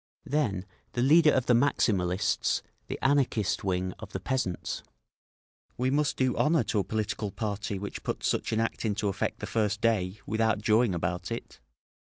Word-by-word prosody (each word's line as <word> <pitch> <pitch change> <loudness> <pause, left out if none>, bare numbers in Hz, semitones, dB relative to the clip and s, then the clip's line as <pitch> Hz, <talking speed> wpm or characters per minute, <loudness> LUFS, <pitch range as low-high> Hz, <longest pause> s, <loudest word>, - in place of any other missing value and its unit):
Then 105 -11 0 0.3
the 120 - +1
leader 155 +3 +6
of 130 - +1
the 125 - +4
Maximalists, 105 -7 +2 0.2
the - - -4
Anarchist 135 -7 +2
wing 90 -1 -1
of - - -10
the - - -2
peasants: 125 -10 -2 1.0
"We 130 +1 +1
must 145 0 +1
do 130 -1 +2
honour 155 +1 +3
to 105 - 0
a - - +1
political 110 0 -2
party 105 0 -3
which 100 +2 -6
puts - - -2
such - - 0
an 110 - +1
act 115 - -1
into 105 -1 0
effect 95 - -2
the - - -2
first 105 -2 0
day, 105 -4 +1
without 110 +1 +1
jawing 110 -1 +3
about 85 +1 -2
it!" - - -6
110 Hz, 170 wpm, -29 LUFS, 100-125 Hz, 1.0 s, leader